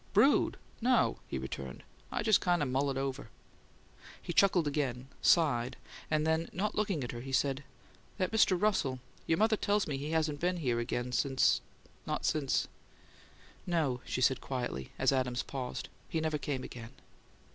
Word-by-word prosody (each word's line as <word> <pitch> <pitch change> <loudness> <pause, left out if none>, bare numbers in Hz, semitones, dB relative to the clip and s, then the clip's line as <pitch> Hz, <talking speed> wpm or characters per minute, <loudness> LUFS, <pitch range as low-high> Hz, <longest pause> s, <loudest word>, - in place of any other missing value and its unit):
"'Brood?' 230 +8 +4 0.2
No!" 245 0 +3
he - - -3
returned. 65 0 -6 0.3
"I - - -1
just 215 -2 +5
kind 175 -3 +2
o' - - +1
mull 135 +2 +1
it 135 - -2
over." 135 -3 -3 0.9
He 175 - -5
chuckled 180 -2 +4
again, 135 -3 -2
sighed, 130 -8 +3 0.3
and 155 0 +1
then, 160 +1 +1
not 205 +4 -1
looking 200 -9 0
at 120 - -4
her, 120 - -6
he 135 +2 -7
said, 135 +1 +1 0.5
"That 185 -3 0
Mr. 215 -5 +4
Russell 190 -11 +1 0.3
your 160 - +3
mother 220 +1 +4
tells 205 0 +1
me 145 -3 -2
he 145 +2 -4
hasn't 155 -2 0
been 180 +2 0
here 125 -8 0
again 120 +1 -2 0.9
not - - -2
since 145 -4 +1 0.5
" - - -25
"No," 130 -6 0
she 130 - -3
said, 130 +1 +3
quietly, 120 - -4
as - - +3
Adams 125 -2 0
paused. 130 -3 -5 0.2
"He 165 - 0
never 155 -1 -1
came 135 -3 -3
again." 120 +1 -9
145 Hz, 170 wpm, -32 LUFS, 130-175 Hz, 0.9 s, just